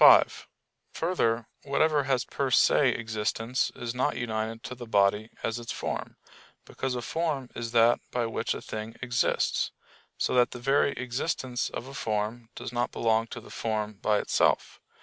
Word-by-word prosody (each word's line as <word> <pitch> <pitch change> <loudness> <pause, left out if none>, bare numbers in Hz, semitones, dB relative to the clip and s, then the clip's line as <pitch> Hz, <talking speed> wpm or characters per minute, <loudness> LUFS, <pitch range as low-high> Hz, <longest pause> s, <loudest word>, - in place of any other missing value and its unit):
5: - - +7 0.5
Further, 120 -10 +1
whatever 145 0 +2
has 130 -2 +1
per 140 -1 -1
se 130 +2 +5
existence 110 +2 -1
is 120 -1 -4
not 125 - 0
united 115 -1 -3
to - - -5
the 120 -1 -9
body 105 +1 +3
as 115 +1 -1
its 115 - -5
form; - - -4 0.5
because 130 -1 -3
a 120 - -3
form 150 -4 -2
is 115 -1 -4
that 115 0 +5
by 120 -1 0
which 115 - -1
a - - -6
thing 110 +1 -6
exists: 120 -2 +1 0.5
so - - 0
that 125 -1 +5
the 125 - -8
very 135 +3 +3
existence 125 0 -2
of - - -6
a 135 - -9
form 110 -1 -2
does - - -6
not 120 0 0
belong 115 0 +2
to - - -7
the - - -13
form 110 -1 -2
by 105 -1 +3
itself. - - +1
120 Hz, 170 wpm, -28 LUFS, 110-130 Hz, 0.5 s, 5